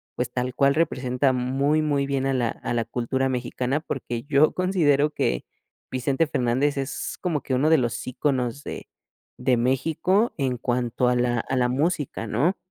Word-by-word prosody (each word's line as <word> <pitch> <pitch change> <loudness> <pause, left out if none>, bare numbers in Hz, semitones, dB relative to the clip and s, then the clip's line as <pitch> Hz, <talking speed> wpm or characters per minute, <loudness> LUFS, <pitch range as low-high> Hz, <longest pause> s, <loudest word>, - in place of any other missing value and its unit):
pues 125 0 -2
tal 125 0 -2
cual 140 0 +3
representa 130 -4 +1
muy 135 +5 +1
muy 145 -2 +1
bien 135 -1 -1
a 135 - +1
la 120 -3 +1
a - - -4
la 115 -1 0
cultura 125 +3 -1
mexicana 125 +2 -1
porque 120 -6 -4
yo 145 +1 +3
considero 155 -6 +2
que - - -1 0.5
Vicente 135 +5 +1
Fernández 135 +1 +1
es 135 0 -4
como 165 -7 -1
que 130 - -3
uno 150 +5 +2
de 160 - +6
los 120 -2 -2
íconos 130 0 -1
de - - -7 0.5
de 125 0 +2
México 160 - +1
en 130 -3 0
cuanto 125 0 0
a 125 - +2
la 120 -1 +1
a 130 - -2
la 125 -1 +3
música 145 -3 -1
¿no? 145 - +1
130 Hz, 175 wpm, -24 LUFS, 125-145 Hz, 0.5 s, de